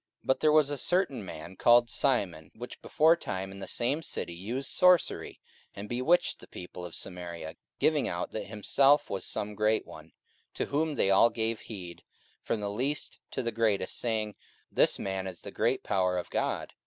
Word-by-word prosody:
44:008:009 - - -31
But 130 - +2
there 155 - +4
was 150 -2 +5
a 145 - -2
certain 175 - +1
man, 95 0 -8
called 120 +3 +5
Simon, 95 - 0
which 120 +2 -9
beforetime 150 - +2
in 100 - -10
the 95 - -6
same 130 +6 0
city 85 - -3
used 115 +10 -4
sorcery, 180 -1 +3 0.4
and 100 +1 -6
bewitched 130 +10 +1
the - - -13
people 90 0 -9
of 85 -2 -7
Samaria, 85 -3 -6 0.2
giving - - +2
out - - -3
that - - -4
himself 135 +7 +3
was 100 - -3
some 105 +1 -3
great 105 +1 +1
one: - - -11
44:008:010 - - -27 0.4
To - - -1
whom 155 +1 0
they 100 -6 +2
all 100 +4 +6
gave 110 -1 -1
heed, 90 -6 -9 0.4
from 110 - -2
the 100 -1 -2
least 135 +8 -2
to - - -3
the 115 - -1
greatest, 110 -4 +1
saying, 110 -3 -1 0.4
This - - +3
man 95 -1 -3
is 90 -2 -8
the - - -8
great - - 0
power 90 -1 +1
of 90 - -5
God. - - -2
110 Hz, 190 wpm, -29 LUFS, 95-135 Hz, 0.4 s, all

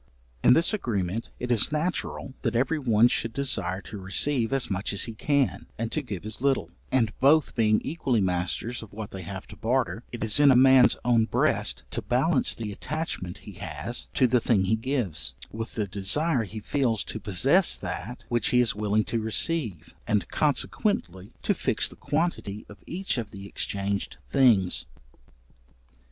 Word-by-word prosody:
In - - +7
this 170 - +2
agreement 110 - -2
it 125 0 -3
is 115 +3 +3
natural 155 -3 -2
that 115 -2 -1
every 135 +6 +1
one 115 -4 +4
should 115 -1 -2
desire 100 -9 -1
to 105 - -9
receive 115 +6 +1
as 135 -2 +1
much 100 +1 -2
as 100 - +2
he 115 - -2
can, 140 +3 0
and 115 0 -3
to 155 - -1
give 105 -8 -7
as 110 +2 -5
little; 135 -1 +1 0.2
and 115 -5 +2
both 145 +3 +4
being 110 -2 +3
equally 135 -6 -1
masters 95 +6 -1
of 110 -3 -12
what 105 0 -7
they 95 - -7
have 95 +2 -7
to - - -10
barter, 115 0 -1
it 120 - -5
is 110 +4 +1
in 145 -1 +7
a 130 - +6
man's 130 0 +6
own 115 -2 +4
breast - - +1
to - - -2
balance - - +1
the 110 -3 -5
attachment 125 - -4
he - - -8
has 120 +1 -5
to 130 - +4
the 125 0 +3
thing 110 -6 +2
he 100 +4 +2
gives, 115 - -2 0.2
with 115 +1 -6
the 105 - 0
desire 110 - +1
he 110 +3 -7
feels 115 -1 0
to - - -6
possess 135 - +3
that 90 +6 -6
which 120 -3 +1
he 125 - +3
is 120 -3 +3
willing 105 +1 +1
to 115 - -2
receive, 110 - -1
and 105 -2 +1
consequently 135 - 0
to - - +2
fix - - 0
the - - -10
quantity 145 - -2
of 105 -1 -13
each 185 -6 -2
of 110 -3 -5
the 100 -1 -10
exchanged 100 0 -2
things. 115 -10 +3
115 Hz, 180 wpm, -26 LUFS, 100-135 Hz, 0.2 s, In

